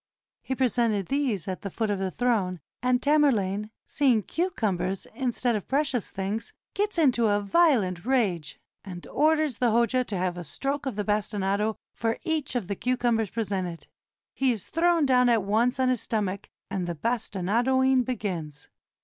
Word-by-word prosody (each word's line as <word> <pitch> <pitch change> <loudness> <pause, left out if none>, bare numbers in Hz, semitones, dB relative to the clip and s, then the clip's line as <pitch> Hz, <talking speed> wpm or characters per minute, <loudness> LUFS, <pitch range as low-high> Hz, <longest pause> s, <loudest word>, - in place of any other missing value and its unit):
He 265 - -3
presented 235 -6 +1
these 260 - 0
at 185 -1 -4
the 200 - -4
foot 215 +3 -2
of 200 - -1
the 190 -1 -1
throne, 195 -6 0 0.2
and 250 0 +2
Tamerlane, 215 -9 +2 0.2
seeing 255 -7 +2
cucumbers 195 - -1
in 255 +1 -1
stead 240 0 0
of 205 - -4
precious 270 -5 0
things, 200 +4 -4 0.2
gets 415 -1 -1
into 250 -8 +4
a 205 0 +2
violent 205 - +2
rage, 205 - 0 0.2
and 180 -3 -8
or 310 +3 +3
ders 305 -6 -1
the 245 -2 +2
Hoja 235 +2 +2
to 205 - -3
have 180 -1 -1
a - - -5
stroke 275 - -3
of 255 - -3
the 210 -1 -2
bastinado 210 0 0 0.2
for 225 0 -1
each 320 -6 -1
of 230 -7 -1
the 200 - -2
cucumbers 240 -2 0
presented. 190 -6 -3 0.5
He 270 - +1
is 220 -7 -1
thrown 335 -1 +3
down 250 -2 +4
at 230 -4 +3
once 230 +6 +1
on 260 -1 +3
his 250 -3 +1
stomach, 200 -3 -2 0.2
and 180 -2 -3
the 170 - -3
bastinadoing 240 - +1
begins. 175 - -4
225 Hz, 170 wpm, -27 LUFS, 195-260 Hz, 0.5 s, into